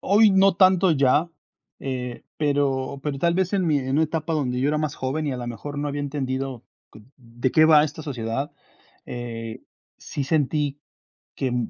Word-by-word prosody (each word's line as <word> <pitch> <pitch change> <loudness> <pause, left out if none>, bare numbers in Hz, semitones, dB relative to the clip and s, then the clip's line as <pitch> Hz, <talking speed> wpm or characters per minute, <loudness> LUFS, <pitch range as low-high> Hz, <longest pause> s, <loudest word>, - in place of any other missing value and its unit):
hoy 210 +2 +5
no 195 0 +5
tanto 185 -1 +5
ya, 145 +3 +3 0.5
eh, 125 -2 -5
pero 140 -2 0
pero 145 -2 -3
tal 170 +2 +2
vez 185 0 0
en 190 -3 +1
mi 150 -3 +3
en 130 0 -4
una 150 +4 +3
etapa 160 +1 -3
donde 130 -5 -1
yo 140 - +2
era 150 0 +1
más 155 -2 -2
joven 140 +4 -2
y 140 - -1
a - - -3
la 120 -1 -5
mejor 145 +5 -6
no 145 +1 -2
había 145 0 -3
entendido 135 -3 -3 0.5
de 120 +1 -3
qué 155 +3 +5
va 155 -1 +7
esta 155 +1 -6
sociedad, 135 0 -3 0.5
eh, 115 -2 -6 0.4
sí 140 - -4
sentí 145 -1 0 0.5
que 135 - -2
m 120 -2 -1
145 Hz, 185 wpm, -24 LUFS, 130-155 Hz, 0.5 s, va